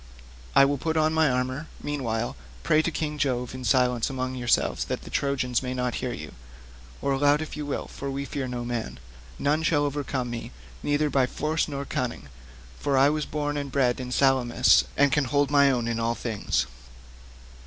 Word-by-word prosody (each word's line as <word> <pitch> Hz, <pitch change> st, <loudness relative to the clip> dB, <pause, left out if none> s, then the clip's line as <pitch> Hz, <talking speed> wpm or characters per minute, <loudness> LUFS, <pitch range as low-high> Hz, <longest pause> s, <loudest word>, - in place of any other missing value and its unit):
I 140 Hz, -, +8 dB
will 140 Hz, 0 st, 0 dB
put 160 Hz, +1 st, -1 dB
on 155 Hz, 0 st, +3 dB
my 160 Hz, -2 st, +4 dB
armour; 130 Hz, +4 st, -1 dB, 0.2 s
meanwhile, 120 Hz, -6 st, -2 dB, 0.3 s
pray 155 Hz, -, +4 dB
to 165 Hz, -, 0 dB
King 150 Hz, -2 st, -3 dB
Jove 125 Hz, -3 st, 0 dB
in 130 Hz, 0 st, -7 dB
silence 125 Hz, -2 st, +2 dB
among 130 Hz, -1 st, -3 dB
yourselves 125 Hz, -2 st, +1 dB
that -, -, -4 dB
the -, -, -10 dB
Trojans 130 Hz, -3 st, 0 dB
may 130 Hz, -1 st, -3 dB
not 125 Hz, -1 st, -1 dB
hear 125 Hz, -, -2 dB
you—or 60 Hz, -, -8 dB
aloud 145 Hz, +2 st, +3 dB
if 155 Hz, -, -5 dB
you 150 Hz, -1 st, -5 dB
will, 145 Hz, -, -2 dB
for 140 Hz, -, -6 dB
we 140 Hz, +1 st, -3 dB
fear 135 Hz, -2 st, -3 dB
no 120 Hz, -1 st, -4 dB
man. 115 Hz, -, -3 dB, 0.4 s
None 150 Hz, +3 st, +1 dB
shall 150 Hz, -2 st, +2 dB
overcome 140 Hz, -3 st, -2 dB
me, 115 Hz, -1 st, -5 dB, 0.3 s
neither 145 Hz, 0 st, +1 dB
by 130 Hz, -2 st, +3 dB
force 155 Hz, +4 st, -1 dB
nor 140 Hz, -2 st, -4 dB
cunning, 125 Hz, -, -3 dB, 0.5 s
for 140 Hz, -2 st, +1 dB
I 135 Hz, +2 st, +6 dB
was 155 Hz, 0 st, -2 dB
born 145 Hz, -1 st, -2 dB
and 140 Hz, -1 st, -4 dB
bred 125 Hz, -3 st, +2 dB
in 125 Hz, -1 st, -5 dB
Salamis, 125 Hz, -2 st, +4 dB
and 140 Hz, 0 st, +4 dB
can 145 Hz, -2 st, +2 dB
hold 145 Hz, +2 st, +1 dB
my 140 Hz, -1 st, +6 dB
own 120 Hz, -3 st, 0 dB
in 115 Hz, -1 st, -1 dB
all 115 Hz, +1 st, 0 dB
things." 100 Hz, -, -1 dB
135 Hz, 190 wpm, -26 LUFS, 120-145 Hz, 0.5 s, I